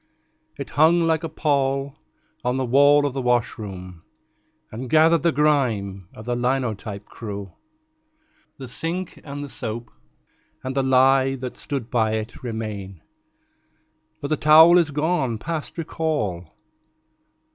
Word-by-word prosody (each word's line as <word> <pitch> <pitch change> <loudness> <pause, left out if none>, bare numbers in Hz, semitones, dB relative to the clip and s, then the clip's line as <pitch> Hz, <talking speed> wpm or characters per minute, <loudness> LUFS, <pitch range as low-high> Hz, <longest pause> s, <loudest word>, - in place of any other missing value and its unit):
It - - -7
hung 160 +4 +4
like 165 0 +1
a 165 - -3
pall 140 -3 0 0.5
on 125 +1 0
the 130 - 0
wall 145 +3 +5
of 140 - -1
the 135 - -2
washroom, 100 -7 -2 0.7
And 120 +3 -6
gathered 160 +2 +5
the 170 - +3
grime 115 - 0
of 110 - -10
the 120 0 -1
linotype 120 -5 -2
crew. 100 -3 -8 1.0
The 130 - -8
sink 165 +8 -4
and 145 0 -6
the - - -6
soap 120 -2 -5 0.7
and 130 +1 -4
the 135 - +2
lye 130 0 +4
that 125 -1 -6
stood 135 -5 -4
by 110 -3 +1
it 110 +3 -4
Remain; 105 - -6 1.2
but 145 -2 -5
the 155 - +1
towel 160 +4 +7
is 165 -3 +2
gone 145 -5 0
past 160 +7 -5
recall. 145 - -2
130 Hz, 135 wpm, -23 LUFS, 110-150 Hz, 1.2 s, towel